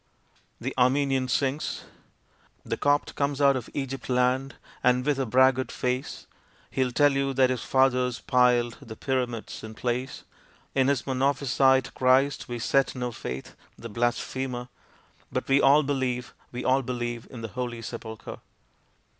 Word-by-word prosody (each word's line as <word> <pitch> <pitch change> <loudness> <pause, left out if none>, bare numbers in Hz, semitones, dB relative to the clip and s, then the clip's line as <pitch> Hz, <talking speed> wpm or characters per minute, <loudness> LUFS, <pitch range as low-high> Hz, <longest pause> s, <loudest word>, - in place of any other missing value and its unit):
The 130 +3 -4
Armenian 135 +1 +2
sings 135 +3 -1 0.8
The - - -2
Copt 145 0 +1
comes 140 -1 -1
out 140 -1 +5
of 130 - -4
Egypt 135 -3 -4
land 125 +2 +1 0.3
and 125 0 +3
with 145 -2 +1
a 135 - 0
braggart 130 +2 +3
face 125 +1 -3 0.5
He'll 130 -2 0
tell 145 +3 +4
you 135 0 -1
that 130 -1 +4
his 125 -3 -2
fathers 125 -2 +2
piled 125 -2 +2
the 110 - -9
Pyramids 125 -4 -3
in 110 0 -8
place. 125 +3 -3 0.5
In 135 -1 +3
his 140 -4 +1
Monophysite 135 -1 +2
Christ 130 +2 +2
we 120 - -3
set 135 +4 +1
no 125 -1 -3
faith, 65 - -7 0.2
the 115 - -8
blasphemer! 120 +2 -2 0.6
But - - -2
we 135 +1 +4
all 145 +3 +6
believe, 130 -3 -2 0.2
we 125 +1 -5
all 130 +1 +3
believe, 120 -2 -4
in 120 - -9
the 115 - -5
Holy 120 0 -4
Sepulchre! 110 -1 -7
130 Hz, 145 wpm, -27 LUFS, 120-135 Hz, 0.8 s, all